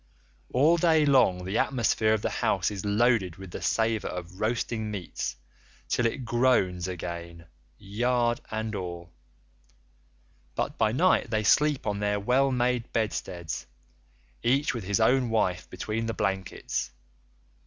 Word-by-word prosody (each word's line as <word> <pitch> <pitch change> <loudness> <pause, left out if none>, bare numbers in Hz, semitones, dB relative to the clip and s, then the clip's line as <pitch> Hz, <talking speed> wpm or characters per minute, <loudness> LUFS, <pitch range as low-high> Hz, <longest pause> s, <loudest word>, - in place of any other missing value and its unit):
All 150 +7 +4
day 160 -2 +4
long 125 -10 +3
the 95 +4 -1
atmosphere 115 -4 +2
of 105 - -5
the - - +1
house - - +1
is 100 -2 -5
loaded 105 -4 +2
with 95 -2 -10
the - - -6
savour 110 -1 0
of 90 +1 -7
roasting 110 0 -1
meats 95 -11 -4 0.5
till 120 - +2
it 125 +2 -4
groans 115 -7 +2
again, 85 -2 -6 0.3
yard 120 +4 0
and 110 0 -3
all; 85 -3 -6 1.4
but - - -2
by 110 -1 +2
night 150 -1 +3
they 110 -1 0
sleep 150 +6 +3
on 100 -1 -1
their 105 0 0
well 130 +6 +2
made 125 -1 0
bedsteads, 90 - -3 0.7
each 135 +4 +2
with 115 -6 -5
his 100 +3 +1
own 125 +2 +3
wife 90 -5 0
between 115 +1 -3
the 115 - -3
blankets. 95 -8 -2
110 Hz, 140 wpm, -27 LUFS, 95-125 Hz, 1.4 s, All